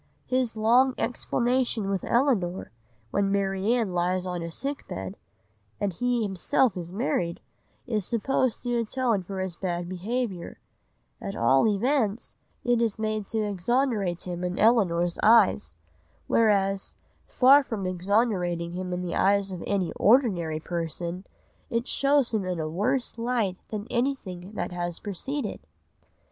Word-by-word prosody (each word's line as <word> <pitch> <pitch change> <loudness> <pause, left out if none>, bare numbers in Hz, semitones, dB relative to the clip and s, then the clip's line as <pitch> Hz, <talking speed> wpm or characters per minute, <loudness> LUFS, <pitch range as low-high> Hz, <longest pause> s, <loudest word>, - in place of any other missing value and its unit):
His 255 -3 0
long 245 +4 +4
explanation 245 -3 0
with 195 -2 -1
Elinor, 230 -9 +1 0.4
when 200 -1 +1
Marianne 200 +2 +1
lies 180 +1 0
on 180 -1 -3
a 170 - -4
sick 275 - -4
bed, - - -5 0.6
and 200 -2 -1
he 245 +4 0
himself 210 +5 +1
is 175 -1 -6
married, 170 -3 -1 0.5
is 220 -5 -1
supposed 240 +3 0
to 245 -1 -1
atone 230 -2 0
for 190 +1 -6
his 190 -2 -3
bad 175 -1 -3
behaviour; 190 +1 -3 0.6
at 100 - -5
all 130 - +4
events 220 +1 0 0.3
it 240 -1 +2
is 225 -3 0
made 215 -2 -2
to 220 -1 -1
exonerate 205 -2 0
him 180 -1 -5
in 180 0 -2
Elinor's 175 -7 +3
eyes, 85 - +4 0.5
whereas, 195 -3 +2 0.3
far 275 +3 +6
from 220 -7 -4
exonerating 180 -2 0
him 180 0 -4
in 180 0 -3
the 175 - -3
eyes 200 0 +2
of 180 -2 -6
any 195 -4 0
ordinary 190 - +3
person, 170 +2 -4 0.4
it 235 -1 -1
shows 275 -3 +2
him 215 -3 +1
in 180 -2 -3
a 155 - -2
worse 230 - -1
light 230 -6 0
than 210 -1 -5
anything 215 -8 -2
that - - -3
has 175 -1 -3
preceded. 225 +5 -4
200 Hz, 140 wpm, -26 LUFS, 180-240 Hz, 0.6 s, far